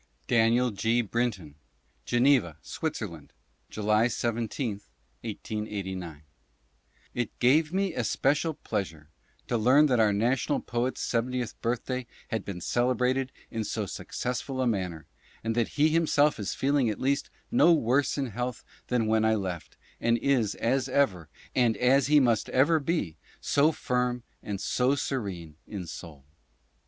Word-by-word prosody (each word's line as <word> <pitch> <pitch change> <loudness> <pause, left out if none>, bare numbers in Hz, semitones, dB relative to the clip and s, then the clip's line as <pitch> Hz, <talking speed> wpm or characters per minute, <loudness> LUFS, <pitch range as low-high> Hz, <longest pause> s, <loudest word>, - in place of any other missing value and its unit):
Daniel 120 +1 +3
G. 115 +4 +1
Brinton: 105 -9 -2 0.5
Geneva, 120 - +3
Switzerland, 100 - -5 0.4
July 105 +2 +2
17, 115 -2 -2 0.4
1889.... 95 -7 -5 0.9
It 120 -3 -3
gave 150 +6 +3
me 190 -1 0
especial 140 - +1
pleasure 80 - -4 0.4
to 120 - 0
learn 130 +7 +6
that 125 -5 +2
our 110 -2 +4
national 115 +6 +1
poet's 120 +2 -2
seventieth 120 0 -1
birthday 125 +1 -2 0.2
had 110 -3 -2
been 90 -3 -6
celebrated 125 +4 +1 0.2
in 115 -1 -2
so 110 0 -2
successful 125 +6 -4
a 130 - +2
manner, 90 -8 -2 0.4
and 115 0 0
that 115 -1 +1
he 150 +2 +5
himself 150 -4 +3
is 100 - -3
feeling 135 -3 +2
at 105 - -3
least 140 +2 0 0.2
no 240 -8 +6
worse 140 -2 +2
in 135 -4 -2
health 125 +2 -4 0.2
than 125 -3 +1
when 110 0 +2
I 110 0 +3
left, 95 -5 -5 0.2
and 115 0 +2
is, 120 -5 +1
as 130 +3 0
ever, 100 - +1 0.2
and 120 -4 +2
as 130 +2 +4
he 150 0 +6
must 120 -5 +2
ever 155 +5 +4
be, 140 - -2 0.2
so 145 +3 +3
firm 125 -4 -1 0.2
and 100 -2 -4
so 130 +6 +1
serene 95 - -4
in 100 -4 -6
soul. 80 -4 -10
120 Hz, 140 wpm, -28 LUFS, 105-135 Hz, 0.9 s, learn